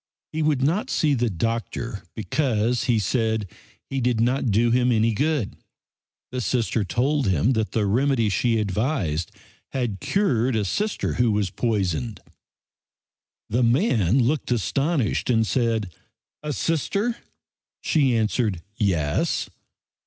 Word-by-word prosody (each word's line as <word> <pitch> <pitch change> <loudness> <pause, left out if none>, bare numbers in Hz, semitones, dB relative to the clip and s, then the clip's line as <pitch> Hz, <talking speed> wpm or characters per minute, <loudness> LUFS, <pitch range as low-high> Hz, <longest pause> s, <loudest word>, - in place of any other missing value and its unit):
He 160 - -1
would 150 -4 +1
not 170 +9 +1
see 150 -2 +2
the 120 -3 +1
doctor 115 +2 -3
because, 120 -1 0
he 120 -3 +2
said, 110 0 0 0.4
he 135 -1 -2
did 120 -2 +1
not 125 +2 +1
do 115 +3 +3
him 125 +1 +3
any 115 0 +2
good. 145 -2 0 0.8
The 125 0 -3
Sister 115 -2 0
told 130 - 0
him 95 - +2
that 110 -3 -1
the 110 -2 +1
remedy 120 +2 +2
she 115 +3 +1
advised 100 - -1 0.4
had 120 -7 -2
cured 130 - +1
a 105 -2 0
Sister 210 - -1
who 120 -2 +2
was 105 -3 0
poisoned. 105 -1 -1 1.3
The 120 +4 0
man 120 - +3
looked 140 +5 0
astonished 135 - 0
and 115 -2 +3
said: 110 -3 0 0.5
"A 150 - -3
Sister?" 200 - -1 0.7
She 135 -6 +2
answered, 110 -5 0
"Yes." 85 -9 0
115 Hz, 130 wpm, -24 LUFS, 105-135 Hz, 1.3 s, do